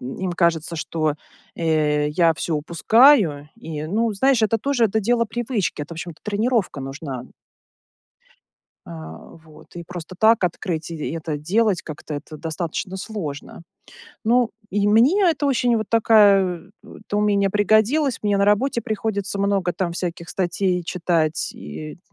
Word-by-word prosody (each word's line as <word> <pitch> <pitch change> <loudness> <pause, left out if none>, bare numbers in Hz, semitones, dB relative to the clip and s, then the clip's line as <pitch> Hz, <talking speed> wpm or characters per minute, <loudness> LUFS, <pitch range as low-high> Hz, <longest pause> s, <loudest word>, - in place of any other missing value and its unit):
м, 125 +2 -6
им 185 -2 -2
кажется, 170 -1 0
что, 155 -1 -1 0.4
э, 150 -2 +1
я 165 0 +3
всё 170 - -5
упускаю 170 - +4
и, 160 -9 -6
ну, 220 +5 0
знаешь, 260 +2 +2
это 225 +1 +2
тоже, 255 -1 +1
это 220 +1 +1
дело 235 +2 +2
привычки. 225 - -2
Это, 145 - -10
в - - -13
общем-то, 170 -2 -8
тренировка 210 - -1
нужна. 135 -1 -6 1.6
А, 80 -1 -9 0.3
вот. 155 +2 -17
И 170 - -7
просто 175 +1 -8
так 220 -1 +4
открыть 170 -2 -3
и 160 -3 -4
это 160 -2 -4
делать 195 +5 +1
как-то- 155 0 -7
это 155 +2 -8
достаточно 170 +4 -4
сложно. 170 -7 -6 0.6
Ну, 240 +1 +3 0.2
и 205 +1 +1
мне 250 - +4
это 295 -2 -1
очень 245 -3 +2
вот 220 -2 -2
такая 200 -6 +4
Это 205 -1 -7
умение 200 -1 +2
пригодилось. 220 +8 +2
Мне 205 -1 +1
на 200 - +3
работе 235 +4 +2
приходится 200 -2 -3
много 195 -3 +1
там 175 -3 -2
всяких 170 -1 -5
статей 180 0 -1
читать, 165 -3 0
и 75 0 -8
190 Hz, 145 wpm, -22 LUFS, 160-220 Hz, 1.6 s, упускаю